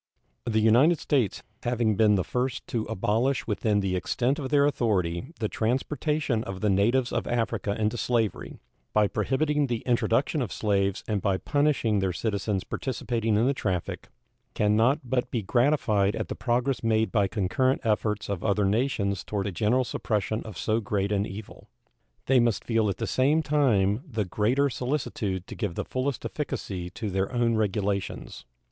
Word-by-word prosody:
The 110 -2 +1
United 120 +10 +5
States, 130 -10 0 0.2
having 120 -3 +1
been 105 0 +4
the 95 - +1
first 125 +5 -2
to 115 -2 -1
abolish 115 +5 0
within 105 -1 +1
the 95 -1 -1
extent 125 - 0
of 135 -3 -4
their 145 -1 +4
authority 105 - 0
the 110 - 0
transportation 130 +2 -1
of 95 -3 -6
the 105 -2 +2
natives 120 +6 +2
of - - -2
Africa 110 -3 -1
into 110 +2 0
slavery, 115 -3 -1 0.4
by 105 -1 +4
prohibiting 150 +5 0
the 120 -3 -2
introduction 125 +4 +1
of 115 -7 -3
slaves 100 -2 0
and 105 -3 -1
by 95 -1 +1
punishing 140 - +1
their 95 -2 0
citizens 100 -1 -1
participating 115 -3 -1
in 115 - +3
the 135 - +3
traffic, 95 -9 -3 0.5
can 105 0 +2
not 130 +7 +3
but 125 0 -1
be 115 -4 -2
gratified 110 -4 +2
at - - -4
the - - -3
progress 125 +1 0
made 110 -1 +2
by 100 -4 +2
concurrent 115 +7 +1
efforts 105 -2 0
of 100 -4 -3
other 105 -1 +2
nations 100 -3 0
toward 100 -2 -3
a 100 - -2
general 110 +8 +2
suppression 110 -2 -2
of 110 -5 -8
so 110 +1 0
great 100 -2 -1
an 100 0 +1
evil. 100 +2 -10 0.6
They 130 -1 +4
must 120 -3 +1
feel 115 -3 +1
at 95 - -2
the - - -2
same 145 +5 +2
time 120 -9 +2
the 110 -5 -1
greater 115 +10 +1
solicitude 120 -8 -2
to - - -9
give 85 - -3
the - - -3
fullest 130 +1 -2
efficacy 100 - -4
to 110 +1 -5
their 95 +1 -1
own 120 -2 +1
regulations. 100 -2 -2
110 Hz, 170 wpm, -27 LUFS, 100-130 Hz, 0.6 s, United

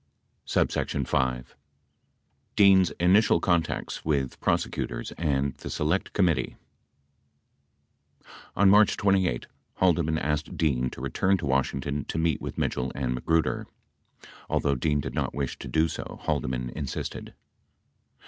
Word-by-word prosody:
69 70 - 0
5. 65 -1 -1 1.0
dean's 95 -3 +6
initial 90 +1 +4
contacts 85 -2 -1
with 70 -4 -1
prosecutors - - -2
and 70 -4 -1
the - - -8
select 80 +6 -1
COMMITTEE 90 -6 +1 2.0
On 100 - +4
March 105 +2 +5
28, 95 -11 +1 0.3
Haldeman 85 -4 +2
asked 75 -1 -2
Dean 65 -5 +1
to 60 - -10
return 95 +9 +1
to 80 - -5
Washington 70 +1 -1
to - - -4
meet 80 -3 +1
with - - -6
Mitchell 60 0 -1
and 65 -3 -1
Magruder. 80 +6 0 0.8
Although 70 - +1
Dean 75 +2 0
did 65 -2 -5
not 70 -2 -2
wish 70 -2 -3
to - - -7
do 80 +6 +2
so, - - -7
Haldeman 60 -1 -2
insisted. 70 -2 -5
75 Hz, 120 wpm, -27 LUFS, 65-85 Hz, 2.0 s, dean's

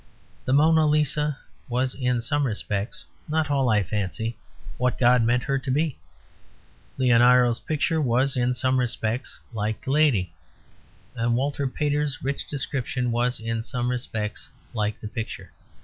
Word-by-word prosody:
The - - 0
"Mona 155 +2 +5
Lisa" 150 -1 +1 0.3
was 125 +1 0
in 125 -3 0
some 145 +3 0
respects 105 -1 -3 0.2
(not 155 -1 +1
all, 135 -3 +2
I 105 -2 +3
fancy) 105 +4 -3 0.4
what 125 0 +1
God 125 0 +5
meant 120 +2 +2
her 135 -1 0
to 130 - -7
be. 150 +2 0 1.0
Leonardo's 125 -1 +5
picture 155 +1 0
was, 130 +1 +2
in 125 0 +1
some 130 +1 +2
respects, 120 0 -2
like 110 -1 -2
the 135 - -1
lady. 130 - +3 0.8
And 115 +1 +1
Walter 140 +2 0
Pater's 145 0 -1
rich 140 +1 -2
description 130 -3 -2
was, 120 +2 0
in 115 0 -2
some 120 +1 -2
respects, 110 -4 -4 0.2
like 105 -2 -1
the - - -6
picture. 115 0 -6
125 Hz, 145 wpm, -25 LUFS, 115-140 Hz, 1.0 s, Mona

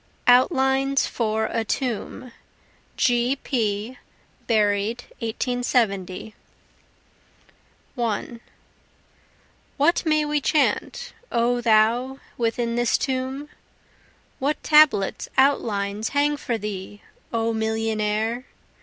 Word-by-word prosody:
Outlines 265 +1 +3
for 220 -1 -1
a 225 +1 -1
Tomb 245 +1 -3 0.7
[G. 245 +1 +2
P., 230 -2 -2 0.5
Buried 215 +1 +1 0.2
1870] 225 -5 -1 1.6
1 235 -1 -3 1.4
What 315 +5 +3
may 305 -2 +2
we 295 0 0
chant, 315 - 0 0.2
O 240 +1 +1
thou 235 +4 +3 0.2
within 235 0 -1
this 240 -1 +2
tomb? 265 +2 -3 0.9
What 285 +3 -1
tablets, 300 -10 +4
outlines, 215 -6 +1
hang 290 +1 +1
for 240 -5 -3
thee, 205 -1 -7 0.3
O 230 0 0
millionnaire? 220 +1 -1
235 Hz, 85 wpm, -23 LUFS, 220-265 Hz, 1.6 s, tablets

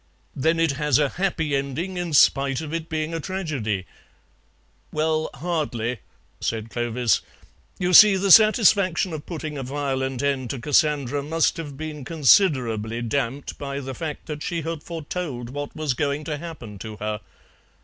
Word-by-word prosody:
"Then 160 +5 +1
it 165 -2 +3
has 150 -4 +3
a 145 -2 +2
happy 160 -5 -1
ending, 140 +7 -3
in 175 -3 -3
spite 135 -2 +4
of 160 -1 -6
it 165 -1 -4
being 155 0 -2
a 165 - -2
tragedy?" 145 - -3 1.1
"Well, 155 0 0
hardly," 135 -9 -2 0.4
said 110 -1 -3
Clovis; 120 0 +1 0.6
"you 180 -1 0
see, 210 +2 +9
the 195 +1 +1
satisfaction 200 -4 +5
of 155 -1 -7
putting 155 -4 -5
a - - -3
violent 135 -1 -2
end 135 -3 0
to 135 - -4
Cassandra 145 0 +1
must 160 +2 +1
have 145 -4 -7
been 155 -2 -6
considerably 125 - +2
damped 135 +3 -3
by 140 -1 -4
the 135 -1 -6
fact 155 +1 -6
that 150 -2 -6
she 165 0 -3
had 165 -1 -4
foretold 150 -7 -5
what 145 +1 -6
was 155 -4 -1
going 140 +3 -1
to 150 -2 -4
happen 135 - -8
to 110 +1 -7
her. 105 0 -3
150 Hz, 160 wpm, -24 LUFS, 130-165 Hz, 1.1 s, see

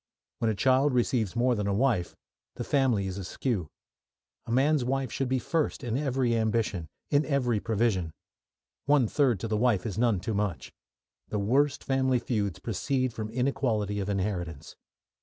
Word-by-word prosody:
When 115 - +1
a 110 - 0
child 130 +5 +3
receives 120 -4 +1
more 125 +1 +3
than 105 -3 -1
a 100 - +1
wife, 115 -7 +1 0.4
the - - -4
family 130 -8 +2
is 95 +1 -4
askew. 95 - -2 0.8
A - - -4
man's 135 +3 +3
wife 135 -1 -1
should 135 -2 -2
be 130 - +2
first 160 +4 -1
in 120 -2 -2
every 130 -4 +1
ambition, 110 -6 0 0.2
in 145 +1 +4
every 125 -7 +1
provision. 105 -6 0 0.8
One 140 -5 +4
third 125 -5 +2
to - - -2
the 110 -1 0
wife 110 -5 +2
is 105 -2 -3
none 115 -5 +3
too 110 +5 -3
much. 100 -4 -2 0.5
The - - -3
worst 135 +8 +1
family 130 -1 +2
feuds 105 -6 -2
proceed 125 +6 -1
from 110 -1 -5
inequality 115 -4 0
of 100 0 -3
inheritance. 90 -6 -3
115 Hz, 165 wpm, -28 LUFS, 105-130 Hz, 0.8 s, in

